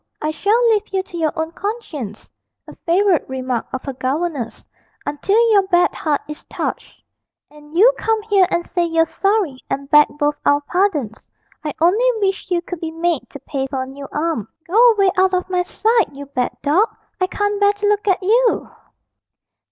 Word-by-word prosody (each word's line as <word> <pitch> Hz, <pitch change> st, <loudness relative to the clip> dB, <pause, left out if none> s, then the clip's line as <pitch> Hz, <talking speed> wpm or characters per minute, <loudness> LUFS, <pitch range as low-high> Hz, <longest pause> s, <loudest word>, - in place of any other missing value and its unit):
I 305 Hz, -, -1 dB
shall 430 Hz, +9 st, +2 dB
leave 425 Hz, -1 st, +1 dB
you 380 Hz, -1 st, 0 dB
to 375 Hz, -, -13 dB
your 315 Hz, -2 st, +1 dB
own 320 Hz, +1 st, -3 dB
conscience' 330 Hz, -, -6 dB, 0.4 s
(a -, -, -11 dB
favourite 360 Hz, -2 st, +2 dB
remark 255 Hz, -2 st, -3 dB
of 260 Hz, -, -5 dB
her 275 Hz, -, -5 dB
governess) 265 Hz, -1 st, -3 dB, 0.4 s
'until 295 Hz, +9 st, 0 dB
your 400 Hz, -3 st, +4 dB
bad 355 Hz, -2 st, +3 dB
heart 300 Hz, -3 st, -1 dB
is 300 Hz, 0 st, -8 dB
touched, -, -, -5 dB, 0.5 s
and 300 Hz, +2 st, -11 dB
you 475 Hz, +7 st, +7 dB
come 445 Hz, -1 st, +1 dB
here 400 Hz, -4 st, +3 dB
and 345 Hz, -2 st, -1 dB
say 350 Hz, -, -1 dB
you're 330 Hz, -1 st, +2 dB
sorry 390 Hz, -9 st, 0 dB
and 275 Hz, +1 st, -4 dB
beg 295 Hz, -1 st, +7 dB
both 295 Hz, 0 st, 0 dB
our 285 Hz, 0 st, +3 dB
pardons. 295 Hz, -, -1 dB, 0.3 s
I 300 Hz, -2 st, -4 dB
only 420 Hz, +10 st, +4 dB
wish 390 Hz, -3 st, -1 dB
you 345 Hz, -1 st, 0 dB
could 360 Hz, -1 st, -6 dB
be 325 Hz, -, -4 dB
made 325 Hz, -6 st, -2 dB
to 285 Hz, -, -10 dB
pay 270 Hz, -2 st, -3 dB
for 265 Hz, -1 st, -3 dB
a -, -, -6 dB
new 275 Hz, +1 st, -9 dB
arm. 305 Hz, -, -2 dB, 0.2 s
Go 460 Hz, +7 st, +5 dB
away 395 Hz, -3 st, +3 dB
out 375 Hz, 0 st, +3 dB
of 365 Hz, -, -1 dB
my 360 Hz, -1 st, +2 dB
sight, 435 Hz, -3 st, +1 dB
you 285 Hz, +1 st, -8 dB
bad 255 Hz, -3 st, -3 dB
dog; 330 Hz, +10 st, +3 dB, 0.3 s
I 370 Hz, -, +2 dB
can't 410 Hz, +1 st, -1 dB
bear 405 Hz, 0 st, +4 dB
to 410 Hz, 0 st, -2 dB
look 415 Hz, 0 st, +1 dB
at 380 Hz, -1 st, +2 dB
you!' 465 Hz, +5 st, +2 dB
345 Hz, 190 wpm, -19 LUFS, 290-405 Hz, 0.5 s, you